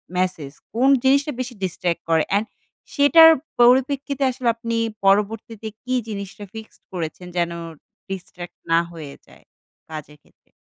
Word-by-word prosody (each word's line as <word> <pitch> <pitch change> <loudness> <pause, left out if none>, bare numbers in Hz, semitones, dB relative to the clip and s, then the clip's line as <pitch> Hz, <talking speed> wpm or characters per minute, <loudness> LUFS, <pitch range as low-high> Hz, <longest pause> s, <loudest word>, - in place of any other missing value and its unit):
Message, 180 -6 -1 0.2
কোন 250 +4 +3
জিনিসটা 280 +3 +3
বেশি 250 -1 -4
distract 175 -2 -2
করে? 160 -1 +3
অ্যান্ড 205 +2 +2 0.5
সেটার 320 +3 +8 0.3
পরিপ্রেক্ষিতে 265 +3 +3
আসলে 250 -1 -4
আপনি 230 0 -3 0.3
পরবর্তীতে 210 +2 +1 0.2
কি 255 - -3
জিনিসটা 200 -1 -6
fixed 220 0 -11
করেছেন 180 +1 -5
যেন 170 -1 +1 0.6
distract 180 -2 -8 0.2
না 165 - +6
হয়ে 155 -4 -9
যায়, - - -19 0.5
কাজের 150 -1 -8
ক্ষেত্রে? - - -32
210 Hz, 130 wpm, -22 LUFS, 175-255 Hz, 0.6 s, সেটার